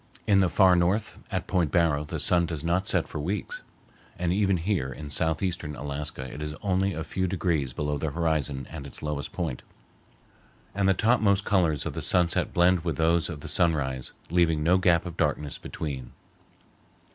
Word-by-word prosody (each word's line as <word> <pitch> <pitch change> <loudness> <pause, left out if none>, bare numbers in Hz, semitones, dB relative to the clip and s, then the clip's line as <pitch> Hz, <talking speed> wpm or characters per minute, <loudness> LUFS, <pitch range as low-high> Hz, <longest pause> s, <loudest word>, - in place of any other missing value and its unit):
In 100 -3 +4
the 95 -2 +3
Far 95 -1 +5
North, 95 +5 0
at 95 -3 -2
Point 90 -6 +1
Barrow, 80 -4 +2
the 80 +1 -5
sun 85 +4 +4
does 80 -3 -4
not 90 +4 0
set - - +1
for - - -6
weeks, 90 +7 -3 0.6
and 90 0 0
even 100 -1 +2
here 85 -6 -1
in 70 +2 -8
southeastern 80 0 -1
Alaska 70 -1 -4
it 70 +3 -8
is 75 0 -4
only 95 -1 +1
a 80 - -3
few 95 +4 -2
degrees 85 -7 0
below 75 +3 -2
the 80 - -1
horizon 75 -4 -1
at 75 -4 -7
its - - -9
lowest 75 -2 -3
point, 80 -8 -3 1.1
and 100 -1 +1
the 95 - +4
topmost 110 -2 +3
colors 85 -8 +1
of - - -3
the - - -4
sunset 90 -2 +2
blend 90 +1 +4
with 85 -1 -3
those 80 0 +2
of 75 -4 -6
the - - -7
sunrise, 70 -7 0 0.2
leaving 80 -3 +2
no 90 +4 +4
gap 90 -2 +3
of 85 - -7
darkness 75 -1 -1
between. 70 -5 -6
85 Hz, 180 wpm, -27 LUFS, 75-90 Hz, 1.1 s, Far